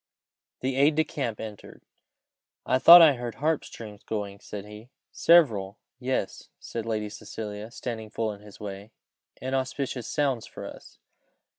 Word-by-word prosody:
The 130 0 -1
aide 145 +2 +4
de 160 - +3
camp 130 -7 -4
entered. 105 -2 -9 0.8
"I 130 - +2
thought 170 +5 +11
I 155 -3 +7
heard 120 -1 -5
harp 155 +2 0
strings 105 -2 -10
going," 100 -2 -5
said 100 -1 -8
he. 105 +3 -12 0.2
"Several! 115 - +4 0.2
yes," 130 -5 -3
said 115 -1 -6
Lady 110 -2 -1
Cecilia, 105 0 -7
standing 115 -3 -6
full 110 0 -2
in 100 - -13
his 105 -1 -14
way. 100 0 -7 0.5
"Inauspicious 130 -1 -2
sounds 135 -6 0
for - - -9
us! - - -11
115 Hz, 145 wpm, -27 LUFS, 105-135 Hz, 0.8 s, thought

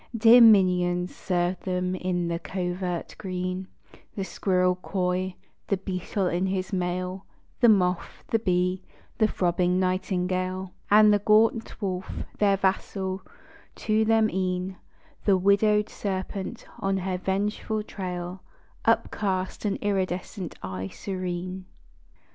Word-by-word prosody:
Dear 230 +2 +8
minions 180 -5 +5
served 175 0 -1
them 180 -1 -1
in 180 -1 -1
the 170 0 -2
covert 180 -1 -3
green: 185 -1 -3 0.5
The 195 - -2
squirrel 185 -1 +1
coy, 185 0 -1 0.3
the 200 - +1
beetle 190 +1 -2
in 180 +1 0
his 190 +1 -2
mail, 180 +1 -2 0.3
The 240 - +6
moth, 180 -4 +1
the 225 - +2
bee, 180 -2 +1 0.4
the 215 - +5
throbbing 180 -1 +1
nightingale, 185 0 -1 0.2
And 210 0 +7
the 205 - +3
gaunt 220 +2 +3
wolf, 185 -1 -3 0.3
their 200 -2 +4
vassal; 190 0 -1 0.5
to 215 0 +1
them 220 0 +4
e'en 185 0 -2 0.5
The 195 -2 +5
widowed 210 +2 +3
serpent, 190 0 -4
on 195 0 0
her 185 -1 -2
vengeful 210 +3 -1
trail, 180 -2 -5 0.4
Upcast 190 -1 0
an 200 -1 +1
iridescent 185 -2 -2
eye 95 0 -4
serene. 185 - -5
185 Hz, 120 wpm, -26 LUFS, 180-200 Hz, 0.5 s, Dear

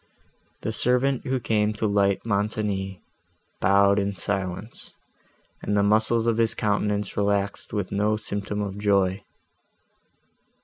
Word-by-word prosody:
The 110 - -2
servant, 125 +3 +3
who 130 0 0
came 110 -2 0
to 110 +1 -3
light 100 -1 +1
Montoni, 100 -3 -2 0.6
bowed 100 +1 +4
in 100 0 -1
silence, 95 +2 -4 0.7
and 105 - -1
the 100 - +3
muscles 110 +2 +2
of 115 -1 +1
his 115 -1 +2
countenance 105 -1 -1
relaxed 100 -1 -1
with 100 -3 -3
no 105 +1 +1
symptom 105 -1 -4
of 100 0 -6
joy. 100 -1 +1
105 Hz, 125 wpm, -24 LUFS, 100-110 Hz, 0.7 s, bowed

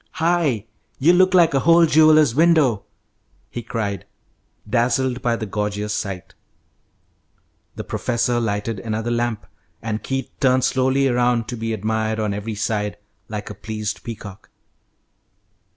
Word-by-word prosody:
"Hi! 160 - +1 0.3
You 160 +6 +4
look 185 +1 +4
like 170 -3 +5
a 135 - +3
whole 170 +3 +5
jeweller's 155 -4 +5
window!" 155 -8 +3 0.7
he 120 - -5
cried, 105 -4 -4 0.6
dazzled 125 +2 +1
by 120 -1 +1
the 115 - -4
gorgeous 105 0 -3
sight. 95 -2 -5 1.4
The - - -5
professor 120 0 -1
lighted 105 -1 -2
another 110 +3 -3
lamp, 120 -2 -1 0.3
and 110 -1 -4
Keith 135 +3 -3
turned 130 -2 +3
slowly 130 +1 +2
around, 120 -2 +1
to 125 - -4
be 115 0 -3
admired 110 +1 -1
on 105 -2 -1
every 105 +2 -4
side 105 -1 -2 0.3
like 105 -1 -6
a - - -6
pleased 110 -1 -5
peacock. 105 -3 -9
115 Hz, 135 wpm, -21 LUFS, 105-135 Hz, 1.4 s, like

